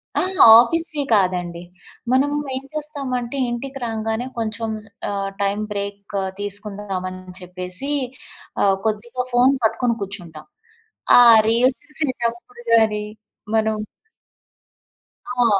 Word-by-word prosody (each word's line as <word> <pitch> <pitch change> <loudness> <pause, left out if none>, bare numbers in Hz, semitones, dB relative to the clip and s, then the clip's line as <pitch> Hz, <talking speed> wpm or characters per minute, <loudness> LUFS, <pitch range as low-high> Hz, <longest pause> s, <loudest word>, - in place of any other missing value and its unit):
ఆ! - - +2 0.4
ఆఫీస్‌వి 310 +3 0
కాదండి. 180 -3 +1 0.5
మనము 280 +3 +2 0.2
ఏం 265 - -4
చేస్తామంటే, 280 -5 -4
ఇంటికి 270 +3 -5
రాంగానే 225 +1 -2
కొంచెం 225 0 -2 0.4
ఆహ్, 200 -1 -2
టైమ్ 200 +1 0
బ్రేక్ 200 0 -6 0.2
తీసుకుందామని 195 -3 -4
చెప్పేసి, 180 +8 -2 0.7
ఆహ్, 195 -1 +4
కొద్దిగా 235 +4 -2
ఫోన్ 250 +3 +5
పట్టుకొని 235 +1 +1
కూర్చుంటాం. 175 -6 -6 0.7
ఆ - - +9 0.3
రిల్స్ 250 +3 +2
చూసేటప్పుడు 245 -5 -4
గాని, 220 -2 +3 0.5
మనం 220 -1 +1 1.7
ఆ! - - +3
220 Hz, 95 wpm, -21 LUFS, 200-250 Hz, 1.7 s, ఆ